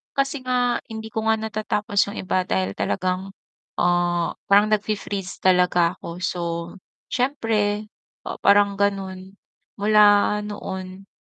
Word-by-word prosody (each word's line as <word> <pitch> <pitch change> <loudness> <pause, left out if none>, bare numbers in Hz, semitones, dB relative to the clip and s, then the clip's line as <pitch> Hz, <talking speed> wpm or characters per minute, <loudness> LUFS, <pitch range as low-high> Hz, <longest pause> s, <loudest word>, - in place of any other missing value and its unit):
Kasi 275 -1 -1
nga, 245 -1 0
hindi 220 0 -6
ko 220 0 -4
nga 220 0 +3
natatapos 215 -1 -3
'yung 215 - -6
iba 185 0 0
dahil 95 - -1
talagang, 185 +1 -2 0.5
ah, 175 -1 +1
parang 205 +2 +5
nag-fe-freeze 205 -2 -2
talaga 180 -2 +3
ako, 170 +1 -8
so 180 0 -2 0.7
siyempre 220 -5 0 0.4
o - - -4
parang 200 0 +5
gano'n, 190 -2 -2 0.5
mula 210 0 +5
noon 190 -2 -7
200 Hz, 120 wpm, -23 LUFS, 185-215 Hz, 0.7 s, parang